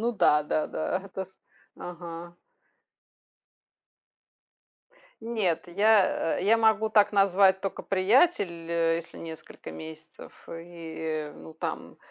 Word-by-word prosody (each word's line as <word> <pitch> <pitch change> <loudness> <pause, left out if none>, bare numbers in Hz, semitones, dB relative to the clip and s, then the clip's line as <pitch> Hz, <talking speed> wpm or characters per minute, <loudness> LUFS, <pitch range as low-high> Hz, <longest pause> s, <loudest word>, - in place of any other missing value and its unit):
Ну 235 +2 0
да 150 -7 +4
да 155 +1 -1
да. 185 +4 -2
Это 190 -1 -6
с 190 - -29 0.5
Ага. 175 0 -8 2.9
Нет, 215 -9 -1
я, 200 -2 +3
э - - -3
я 225 +2 +4
могу 220 -1 +3
так 210 -1 +5
назвать 195 -1 +4
только 195 - -4
приятеля, 180 - +2
если 165 0 -8
несколько 160 -1 -9
месяцев 160 0 -11 0.2
и, 160 -2 -5
ну, 160 - -12
там. - - -5
175 Hz, 110 wpm, -27 LUFS, 165-205 Hz, 2.9 s, так